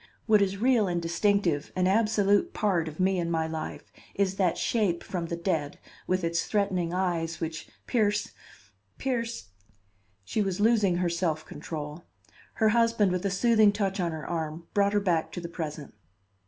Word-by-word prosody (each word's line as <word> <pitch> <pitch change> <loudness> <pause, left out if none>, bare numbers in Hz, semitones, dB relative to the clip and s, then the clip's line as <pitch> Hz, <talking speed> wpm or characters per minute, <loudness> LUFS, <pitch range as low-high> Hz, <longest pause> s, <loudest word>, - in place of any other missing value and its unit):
What 215 -2 +5
is 200 0 +1
real 235 -2 +3
and 175 -1 0
distinctive, 170 -2 +1
an 185 0 +1
absolute 205 0 +2
part 180 -6 +1
of 155 +2 -8
me 185 0 +2
and 170 -1 -1
my 160 -1 +1
life, 160 -1 -6 0.2
is 195 -1 +1
that 180 -4 +2
shape 200 -7 0
from 175 -3 -4
the 170 - -3
dead, 165 -4 -2 0.3
with 185 0 0
its 165 0 0
threatening 190 -5 0
eyes 175 -3 -1
which 165 -1 -5 0.2
pierce 210 -4 +1 0.7
pierce 235 - -3 0.4
" 95 0 -41
She 210 - -1
was 195 -2 -1
losing 210 -4 +3
her 175 0 +1
self 170 -2 -1
control. 150 +1 -7 0.5
Her 220 -1 +3
husband, 230 -3 +3
with 180 +2 -1
a - - 0
soothing 215 +1 +4
touch 200 -1 -2
on 175 -2 0
her 160 -1 -6
arm, 165 -1 -4
brought 200 0 +2
her 205 - +4
back 175 -5 0
to - - -4
the 170 - -5
present. 155 -3 -6
185 Hz, 175 wpm, -28 LUFS, 165-205 Hz, 0.7 s, What